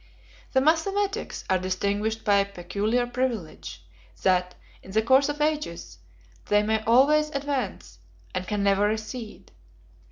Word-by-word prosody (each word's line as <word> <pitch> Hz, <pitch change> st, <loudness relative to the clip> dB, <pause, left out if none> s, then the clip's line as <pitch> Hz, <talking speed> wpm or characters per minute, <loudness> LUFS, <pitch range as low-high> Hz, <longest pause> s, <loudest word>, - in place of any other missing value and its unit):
The 265 Hz, -, +4 dB
mathematics 395 Hz, +8 st, 0 dB
are 190 Hz, -1 st, +2 dB
distinguished 200 Hz, +4 st, -2 dB
by 205 Hz, -1 st, +4 dB
a 200 Hz, -, +3 dB
peculiar 200 Hz, +6 st, -1 dB
privilege, 235 Hz, -, -4 dB, 0.4 s
that, 180 Hz, -1 st, +2 dB, 0.3 s
in -, -, -15 dB
the 220 Hz, +3 st, +1 dB
course 265 Hz, +4 st, +4 dB
of 295 Hz, +1 st, -3 dB
ages, 170 Hz, -, -2 dB, 0.5 s
they 205 Hz, 0 st, +3 dB
may 220 Hz, 0 st, +1 dB
always 290 Hz, +6 st, +4 dB
advance, 275 Hz, -, -4 dB, 0.3 s
and 185 Hz, -, -3 dB
can 205 Hz, -2 st, -1 dB
never 200 Hz, +1 st, +3 dB
recede. 220 Hz, +1 st, -5 dB
220 Hz, 130 wpm, -26 LUFS, 195-270 Hz, 0.5 s, The